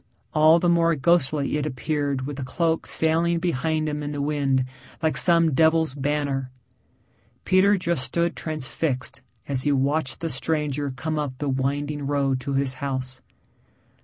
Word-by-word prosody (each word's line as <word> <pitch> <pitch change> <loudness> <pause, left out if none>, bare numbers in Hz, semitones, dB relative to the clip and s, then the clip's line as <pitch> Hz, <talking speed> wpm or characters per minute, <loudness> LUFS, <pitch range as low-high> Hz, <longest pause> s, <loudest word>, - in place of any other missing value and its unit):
All 155 +2 +6
the 175 - 0
more 170 -1 +3
ghostly 150 -1 +1
it 150 0 -2
appeared 140 -1 -2
with 145 0 -6
the 140 - -4
cloak 165 +5 -1
sailing 165 +2 +2
behind 160 -2 -1
him 150 0 -3
in 145 0 -4
the 145 - -4
wind 140 -3 0 0.4
like 160 - +1
some 170 -3 +5
devil's 160 0 +3
banner. 140 -2 -2 1.0
Peter 195 +2 +4
just 170 -6 -1
stood 170 0 -1
transfixed 135 -3 -3 0.3
as 135 -2 +4
he 145 - +1
watched 140 0 0
the 165 - -2
stranger 145 0 -1
come 155 +4 -3
up 145 -3 -3
the 145 +1 -3
winding 140 +2 -2
road 140 -2 0
to 140 +2 -3
his 135 -1 0
house. 130 -2 -3
145 Hz, 155 wpm, -24 LUFS, 135-160 Hz, 1.0 s, All